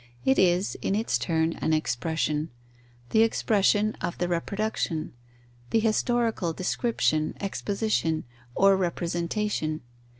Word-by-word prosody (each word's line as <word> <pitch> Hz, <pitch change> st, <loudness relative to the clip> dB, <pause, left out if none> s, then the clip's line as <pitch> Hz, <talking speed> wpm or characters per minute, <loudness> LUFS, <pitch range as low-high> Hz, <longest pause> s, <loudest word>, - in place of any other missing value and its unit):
It 135 Hz, -, +4 dB
is, 180 Hz, +1 st, +3 dB
in 195 Hz, -, 0 dB
its 220 Hz, +2 st, 0 dB
turn, 160 Hz, -1 st, +1 dB
an 160 Hz, -, 0 dB
expression: 155 Hz, +1 st, -1 dB, 0.6 s
the 220 Hz, -, +5 dB
expression 215 Hz, -1 st, +2 dB
of 175 Hz, -, -3 dB
the 175 Hz, -, 0 dB
reproduction; 175 Hz, -2 st, -2 dB, 0.6 s
the -, -, +2 dB
historical 225 Hz, -4 st, +1 dB
description, 180 Hz, -5 st, 0 dB
exposition, 200 Hz, -5 st, -1 dB, 0.3 s
or 195 Hz, 0 st, +5 dB
representation. 170 Hz, -2 st, -1 dB
180 Hz, 105 wpm, -27 LUFS, 160-215 Hz, 0.6 s, the